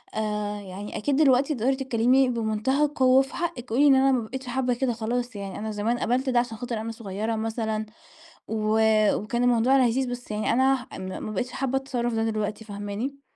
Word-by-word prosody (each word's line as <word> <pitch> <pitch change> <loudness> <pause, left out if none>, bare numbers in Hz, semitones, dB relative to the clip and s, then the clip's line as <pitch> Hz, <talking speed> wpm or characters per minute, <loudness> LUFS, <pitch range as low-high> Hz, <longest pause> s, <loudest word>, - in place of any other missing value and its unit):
آآ 210 -1 -2
يعني 200 +1 -7
أكيد 280 +5 0
دلوقتي 275 0 +4
تقدري 255 +3 +1
تتكلمي 260 0 +2
بمنتهى 235 +5 +1
القوة 260 -2 +4
في 270 - -6
حقِك، 260 -8 -4
قولي 265 +6 +4
إن 275 - +7
أنا 270 +1 +4
ما 255 -2 +2
بقيتش 265 +2 -7
حابة 250 0 0
كده 245 0 0
خلاص، 240 +1 -3
يعني 200 -1 -6
أنا 220 +1 -4
زمان 215 +3 -1
قبلت 255 +3 0
ده 245 -2 +3
عشان 240 -2 -3
خاطر 235 -2 -4
أنا 230 - -4
صغيرة 220 0 -3
مثلًا 220 -1 -2 0.6
و 220 0 0 0.4
وكان 235 +4 -2
الموضوع 245 +2 +4
لذيذ 245 +2 0
بس 245 -2 -7
يعني 210 0 0
أنا 265 +1 +2
م - - -6 0.2
ما 215 - -4
بقيتش 245 +5 -3
حابة 270 +1 -1
التصرف 245 -3 -2
ده 225 0 0
دلوقتي، 215 -1 -2
فاهماني؟ 205 +7 -5
240 Hz, 195 wpm, -25 LUFS, 215-260 Hz, 0.6 s, إن